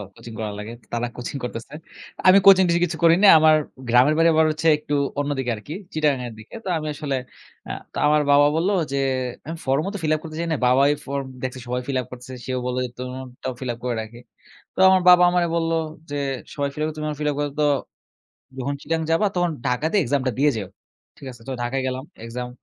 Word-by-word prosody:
Coaching 115 - -11
করা 105 -1 -3
লাগে। 110 +3 -7 0.2
তারা 120 +1 -1
কোচিং 125 +3 -5
করতেছে। 115 +2 -6 0.5
আমি 185 +1 +8
কোচিং-টোচিং 185 -3 +6
কিছু 165 - -5
করি 165 0 +7
নাই। 200 - +10
আমার 155 0 +6 0.3
গ্রামের 125 +5 +5
বাড়ি 165 0 +5
আবার 160 0 +4
হচ্ছে 155 +1 -2
একটু 150 -1 -6 0.3
অন্যদিকে 140 -4 -1
আরকি, 125 +9 -9 0.2
চিটাগংঙ্গের 140 -6 0
দিকে। 110 - -12
তো - - -3
আমি 155 -1 -4
আসলে 145 -2 -3 0.5
আ - - -3 0.2
তো - - -7
আমার 150 0 +4
বাবা 145 +1 +6
বলল 170 +4 +1 0.2
যে, 140 - -1 0.5
আমি 165 +1 -5
ফর্মও 140 +7 +1
তো - - -3
ফিল 155 - +1
আপ - - -4
করতে 155 -1 -8
চাই 170 - -2
না। 155 - +1
বাবাই 135 +3 +4 0.2
ফর্ম 140 0 -3 0.2
দেখছে, 130 0 -4
সবাই 125 +1 -2
ফিল 135 - -1
আপ - - -11
করতেছে, 125 +1 -9
সেও 130 -1 -2
বলল 125 0 -2
যে, - - -6
"তোমারটাও 130 0 -6
ফিল 130 - -4
আপ 115 - -12
করে 125 -2 -1
রাখি।" 110 +2 -10 0.6
তো - - -16
আমার 190 0 +5
বাবা 180 0 +8
আমারে 175 -1 +2
বলল 165 0 0 0.4
যে, 145 - -3 0.4
"সবাই 140 -1 -1
ফিল 150 - -8
আপ - - +1
করে 155 - -6
তুমি 155 0 -4
আমার 150 -1 -5
ফিল 150 - 0
আপ - - -7
করে, 145 - 0
তো - - +3 0.9
যখন 140 +2 -2
চিটাগংঙ্গে 160 +1 -2
যাবা, 185 +6 +3
তখন 175 -1 +2 0.2
ঢাকাতে 150 +10 0
এক্সামটা 130 0 0
দিয়ে 145 +1 +4
যেও।" 100 -4 -4 0.5
ঠিক 135 - -11
আছে? 120 - -16
তো - - -2
ঢাকায় 130 +2 -1
গেলাম, 130 +1 -3 0.2
এক্সাম 125 +1 -5
140 Hz, 220 wpm, -23 LUFS, 125-160 Hz, 0.9 s, নাই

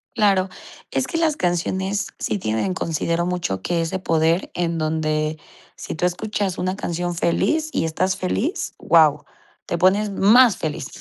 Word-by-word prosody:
Claro, 195 -4 +3 0.4
es - - 0
que 330 - -2
las 320 -3 +1
canciones 190 - -1
sí - - -1
tienen 110 - -1
considero 170 0 -1
mucho, 170 - -2
que 170 - 0
ese 165 +3 -2
poder 165 0 +1
en 170 -1 -1
donde 155 -1 -1 0.3
si - - -7
tú 175 - +1
escuchas 195 +1 -2
una 185 +1 -2
canción 175 -2 -3
feliz 310 - +1
y - - 0
estás 185 +4 0
feliz, 235 - -2
guau, 155 -3 +4 0.4
te - - -1
pones 195 +4 +3
más 220 +4 +5
feliz. 150 -4 -4
175 Hz, 155 wpm, -22 LUFS, 165-195 Hz, 0.4 s, más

